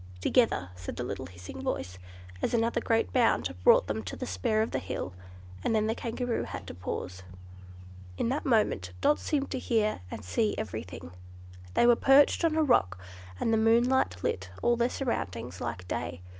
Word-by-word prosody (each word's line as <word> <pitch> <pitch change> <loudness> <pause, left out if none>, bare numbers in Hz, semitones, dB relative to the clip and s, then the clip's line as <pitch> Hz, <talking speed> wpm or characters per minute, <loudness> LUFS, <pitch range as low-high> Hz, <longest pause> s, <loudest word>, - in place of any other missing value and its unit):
"Together!" 155 - +2
said 90 -1 -7
the - - -3
little - - -5
hissing 90 0 -9
voice, 90 +1 -3 0.4
as - - +1
another 230 +1 +1
great 225 -1 +1
bound 230 - +2
brought - - +6
them 110 +2 -2
to 95 -4 -6
the - - -5
spur 95 - 0
of 225 - -4
the - - -1
hill; 95 -1 -5 0.5
and 225 - +1
then 215 0 +2
the 220 - +1
Kangaroo 235 +1 -2
had - - -7
to - - -7
pause. 90 +1 -5 1.0
In - - 0
that 275 +4 -1
moment 210 - +1
Dot 295 - +3
seemed 280 -2 -1
to 260 - -2
hear 220 - 0
and 105 - -7
see 210 - 0
everything. 90 -4 -6 0.6
They - - +5
were 240 0 +7
perched 275 +6 +5
on 325 -2 +2
a 320 - +3
rock, 95 - +3 0.4
and 225 - +1
the - - +4
moonlight 225 - +3
lit 95 0 -2
all 240 - +4
their 240 +1 +1
surroundings 125 - -3
like 115 -7 -4
day. 85 0 -4
215 Hz, 185 wpm, -29 LUFS, -, 1.0 s, were